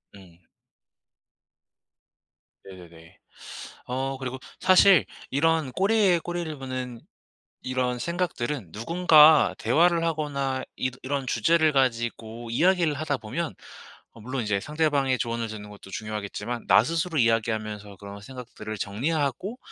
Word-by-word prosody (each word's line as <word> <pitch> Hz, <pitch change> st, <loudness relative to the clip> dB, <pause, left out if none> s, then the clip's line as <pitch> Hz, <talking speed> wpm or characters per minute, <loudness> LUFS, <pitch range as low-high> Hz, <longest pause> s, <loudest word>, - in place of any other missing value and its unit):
응. 90 Hz, -3 st, -17 dB, 2.2 s
네네네. 85 Hz, -2 st, -14 dB, 0.7 s
어 135 Hz, +2 st, -2 dB
그리고 130 Hz, 0 st, -5 dB, 0.2 s
사실 185 Hz, -2 st, +6 dB, 0.3 s
이런 155 Hz, -1 st, +1 dB
꼬리에 195 Hz, -, +3 dB
꼬리를 175 Hz, -2 st, -4 dB
무는 130 Hz, -3 st, -6 dB, 0.6 s
이런 125 Hz, -1 st, -2 dB
생각들은 150 Hz, -, -3 dB
누군가 155 Hz, -, +5 dB
대화를 165 Hz, +8 st, +3 dB
하거나 140 Hz, -5 st, -2 dB
이러 130 Hz, 0 st, -3 dB
이런 135 Hz, 0 st, -2 dB
주제를 155 Hz, +8 st, +3 dB
가지고 120 Hz, -3 st, -1 dB
이야기를 170 Hz, +4 st, +3 dB
하다 145 Hz, -1 st, -2 dB
보면 155 Hz, +9 st, -4 dB, 0.6 s
어 115 Hz, -, -16 dB
물론 130 Hz, +2 st, -3 dB
이제 105 Hz, -2 st, 0 dB
상대방의 145 Hz, -2 st, 0 dB
조언을 115 Hz, -1 st, -2 dB
듣는 105 Hz, -1 st, -8 dB
것도 100 Hz, -1 st, -13 dB
중요하겠지만 110 Hz, +2 st, -5 dB
나 110 Hz, -, +6 dB
스스로 165 Hz, +2 st, -2 dB
이야기하면서 110 Hz, -3 st, -1 dB
그런 100 Hz, 0 st, -10 dB
생각들을 115 Hz, -3 st, -8 dB
정리하고 145 Hz, -, -2 dB
130 Hz, 290 characters per minute, -26 LUFS, 110-160 Hz, 2.2 s, 사실